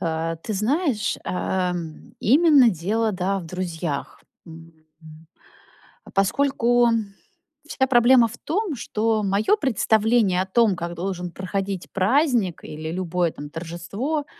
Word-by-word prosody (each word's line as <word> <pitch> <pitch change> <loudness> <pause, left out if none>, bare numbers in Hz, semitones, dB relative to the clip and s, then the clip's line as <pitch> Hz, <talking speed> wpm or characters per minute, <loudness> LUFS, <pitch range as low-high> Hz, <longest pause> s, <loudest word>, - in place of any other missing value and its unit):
А, 165 -1 -2
ты 165 +7 -6
знаешь, 245 - 0
ам, 180 -3 -3
именно 285 0 +5
дело, 210 +6 -1
да, 190 +1 -1
в 175 - -8
друзьях. 170 -4 -5 0.2
М, 165 0 -12 0.3
м, 160 +1 -14 0.9
поскольку 240 +3 +2 0.8
вся 265 -3 0
проблема 240 -1 +5
в 235 +2 -11
том, 370 0 -2
что 220 -2 -1
моё 200 - +2
представление 220 - +2
о 190 - -1
том, 215 0 +3
как 170 0 -5
должен 180 0 -4
проходить 195 0 -4
праздник 225 - +1
или 155 +1 -6
любое, 175 -1 -1
там, 145 0 -9
торжество 175 - -4
195 Hz, 120 wpm, -23 LUFS, 170-240 Hz, 0.9 s, именно